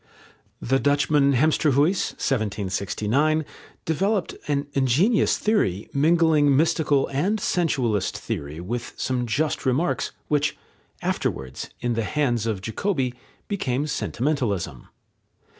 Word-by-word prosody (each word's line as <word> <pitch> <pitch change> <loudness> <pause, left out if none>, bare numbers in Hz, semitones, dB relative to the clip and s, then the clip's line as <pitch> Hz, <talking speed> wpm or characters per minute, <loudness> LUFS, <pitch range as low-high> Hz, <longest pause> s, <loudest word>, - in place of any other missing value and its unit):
The 135 +3 +1
Dutchman 145 0 +3
Hemsterhuis 150 +4 +2
(1769) 110 - 0 0.4
developed 195 +4 0
an 145 -1 0
ingenious 140 - +3
theory, 110 - 0
mingling 150 -2 +4
mystical 150 -2 +2
and 180 +11 0
sensualist 130 - 0
theory 75 +2 -5
with 115 +7 -4
some 125 -2 -1
just 150 +7 0
remarks, 135 +7 0 0.2
which 150 -1 +1 0.5
afterwards, 65 -1 -3
in 120 0 0
the 115 - 0
hands 120 -4 0
of 105 -4 -2
Jacobi, 130 - -1 0.3
became 145 -9 -1
sentimentalism. 115 - -2
140 Hz, 100 wpm, -24 LUFS, 115-155 Hz, 0.5 s, mingling